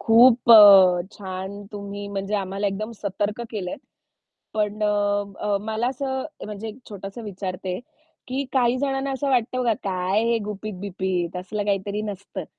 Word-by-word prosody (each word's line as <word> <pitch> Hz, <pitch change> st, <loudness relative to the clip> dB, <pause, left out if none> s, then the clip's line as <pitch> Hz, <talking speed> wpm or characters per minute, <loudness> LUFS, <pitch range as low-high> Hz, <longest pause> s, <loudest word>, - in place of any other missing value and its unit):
खूप 235 Hz, +1 st, +6 dB
अ, 195 Hz, -5 st, +9 dB
छान 190 Hz, +1 st, -6 dB
तुम्ही 200 Hz, 0 st, -6 dB
म्हणजे 200 Hz, +1 st, -3 dB
आम्हाला 195 Hz, 0 st, -1 dB
एकदम 210 Hz, +3 st, -3 dB
सतर्क 205 Hz, +2 st, -2 dB
केलंय. 190 Hz, -5 st, -4 dB, 0.8 s
पण 210 Hz, 0 st, -1 dB
अ, 205 Hz, 0 st, 0 dB
मला 220 Hz, +3 st, -2 dB
असं 265 Hz, 0 st, -3 dB, 0.2 s
म्हणजे 210 Hz, +1 st, -6 dB
एक 220 Hz, +3 st, -9 dB
छोटंसं 200 Hz, +2 st, -7 dB
विचारते, 185 Hz, -2 st, -4 dB, 0.5 s
की 265 Hz, +2 st, -2 dB
काही 245 Hz, -2 st, +3 dB
जणांना 270 Hz, 0 st, -1 dB
असं 275 Hz, +1 st, -2 dB
वाटतं 255 Hz, 0 st, +1 dB
बघ 230 Hz, -2 st, +3 dB
काय 190 Hz, +2 st, 0 dB
हे 230 Hz, 0 st, +2 dB
गुपित-बिपित 190 Hz, -4 st, -3 dB
असलं 195 Hz, +3 st, -3 dB
काहीतरी 200 Hz, +1 st, -1 dB
नसतं. 200 Hz, -2 st, -6 dB
205 Hz, 140 wpm, -24 LUFS, 195-225 Hz, 0.8 s, अ